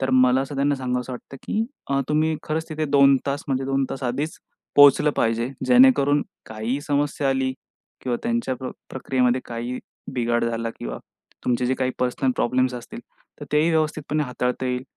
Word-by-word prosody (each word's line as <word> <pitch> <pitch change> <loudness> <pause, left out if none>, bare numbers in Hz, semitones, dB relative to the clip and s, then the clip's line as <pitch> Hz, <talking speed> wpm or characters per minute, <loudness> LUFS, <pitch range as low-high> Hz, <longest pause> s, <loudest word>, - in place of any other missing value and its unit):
तर 130 - 0
मला 130 0 +5
असं 135 +1 -4
त्यांना 140 +1 +2
सांगावंसं 125 -1 -3
वाटतं 130 +2 -9
की 220 +1 -1 0.3
अ, 140 - +2
तुम्ही 155 +1 +2
खरंच 160 +2 -3
तिथे 155 0 -2
2 140 -1 +5
तास 140 +1 -1
म्हणजे 135 0 0
2 135 0 +1
तास 135 - -5
आधीच 140 +6 -2 0.4
पोहोचलं 145 +1 +7
पाहिजे. 115 +2 +1 0.2
जेणेकरून 250 - +5 0.2
काहीही 110 +5 -3
समस्या 145 -1 0
आली 130 -1 +1 0.5
किंवा 125 -2 -1
त्यांच्या 235 - -1
प् 130 - -4 0.2
प्रक्रियेमध्ये 130 -1 +1
काही 120 +2 -4 0.3
बिघाड 120 -2 0
झाला 115 0 -2
किंवा - - -5 0.5
तुमचे 125 0 +1
जे 130 - +1
काही 130 -1 -1
पर्सनल 125 +1 0
प्रॉब्लेम्स 130 +1 +1
असतील, 120 -1 -8 0.4
तर - - -5
तेही 155 +3 +3
व्यवस्थितपणे 155 -1 0
हाताळता 125 0 -2
येईल. 125 0 -1
130 Hz, 170 wpm, -23 LUFS, 125-145 Hz, 0.5 s, पोहोचलं